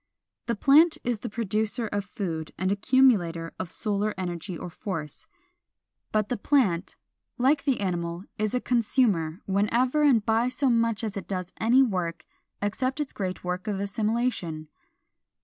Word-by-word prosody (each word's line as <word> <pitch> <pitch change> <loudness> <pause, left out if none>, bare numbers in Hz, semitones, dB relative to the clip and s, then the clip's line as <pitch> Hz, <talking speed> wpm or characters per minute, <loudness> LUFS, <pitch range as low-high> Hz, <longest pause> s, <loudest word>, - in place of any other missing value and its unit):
The 235 - 0
plant 300 +9 +5
is 240 -3 -1
the - - -5
producer 220 +1 -1
of 205 -1 -2
food 165 -6 -4
and 185 +2 0
accumulator 200 -7 +3
of 185 - -4
solar 210 -1 -1
energy 175 -1 -4
or 175 - -7
force. 160 -5 -6 0.8
But 215 -1 +1
the 245 - -1
plant, 200 -9 +1 0.4
like 275 +4 +2
the 270 -3 +1
animal, 170 -2 -2 0.2
is 215 +2 0
a 250 - 0
consumer 210 - +1
whenever 235 +9 +2
and 255 -8 +4
by 225 +2 +2
so 270 0 +1
much 230 -1 +1
as 210 -3 -3
it 200 - -6
does 185 -2 -4
any 245 +4 +5
work 180 -8 -2 0.4
except 255 +7 -1
its 295 -3 -3
great 185 -2 -4
work 180 +3 -3
of 200 -2 -1
assimilation. 200 -6 -1
210 Hz, 150 wpm, -27 LUFS, 185-245 Hz, 0.8 s, plant